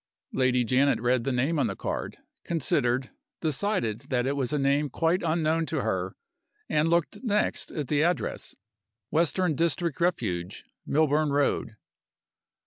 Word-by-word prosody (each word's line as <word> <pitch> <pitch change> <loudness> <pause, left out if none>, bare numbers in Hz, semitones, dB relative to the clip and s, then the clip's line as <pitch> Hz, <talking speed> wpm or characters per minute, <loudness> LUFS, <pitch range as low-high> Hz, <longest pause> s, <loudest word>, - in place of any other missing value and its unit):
Lady 125 -1 +2
Janet 130 +4 +3
read 120 0 +1
the 135 - +1
name 135 +6 +1
on 135 - +2
the - - -3
card - - -4 0.3
considered 130 -5 0 0.3
decided 155 - -1
that 125 -2 +1
it 140 +2 0
was 130 -4 -1
a 150 - +1
name 140 +1 +2
quite 165 +7 +1
unknown 160 0 +1
to - - -1
her - - -2 0.5
and 150 +1 +2
looked 170 -1 0
next 210 -4 0
at 150 -4 -4
the 145 +1 +2
address: 175 -2 -1 0.6
"Western 170 +2 +2
District 170 +1 0
Refuge, 90 - -1 0.2
Milburn 155 0 +2
Road." 140 -5 0
145 Hz, 140 wpm, -27 LUFS, 130-165 Hz, 0.6 s, Janet